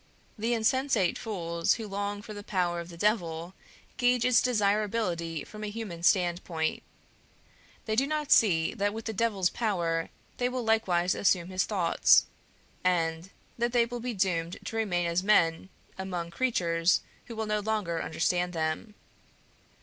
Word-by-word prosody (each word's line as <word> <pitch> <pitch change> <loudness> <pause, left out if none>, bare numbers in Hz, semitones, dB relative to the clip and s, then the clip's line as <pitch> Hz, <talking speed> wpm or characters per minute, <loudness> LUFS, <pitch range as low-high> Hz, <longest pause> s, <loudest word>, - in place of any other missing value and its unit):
The 230 +3 0
insensate 230 -4 +1
fools 170 -6 -1
who 225 -2 -6
long 205 +1 -3
for 215 - -8
the 205 - -7
power 180 -4 -1
of 170 0 -7
the 170 - -11
Devil 175 -4 0 0.4
gauge 245 -1 +2
its 250 -2 +5
desirability 205 -7 0
from 215 0 -10
a 210 - -3
human 205 -6 -6
standpoint; 175 -3 +1 1.0
they 220 - -1
do 270 +5 +2
not 300 -1 -2
see 165 -7 +4
that 205 -2 -1
with 225 - -6
the 220 - -3
Devil's 200 -4 +1
power 170 -7 -1 0.3
they 245 0 +1
will 250 -1 -3
likewise 190 -6 +2
assume 185 -3 +1
his 185 0 0
thoughts, 185 -6 +4 0.6
and 165 -1 0 0.3
that 240 +1 0
they 240 -1 +4
will 240 +1 -6
be 240 0 -4
doomed 175 -3 0
to - - -5
remain 185 -6 0
as 170 +1 +1
men 185 -3 +2 0.3
among 180 -3 -4
creatures 170 -6 +1 0.2
who 230 - -8
will 220 0 -2
no 210 0 0
longer 205 -6 -1
understand 175 +2 0
them. 160 +7 -3
195 Hz, 155 wpm, -29 LUFS, 170-225 Hz, 1.0 s, its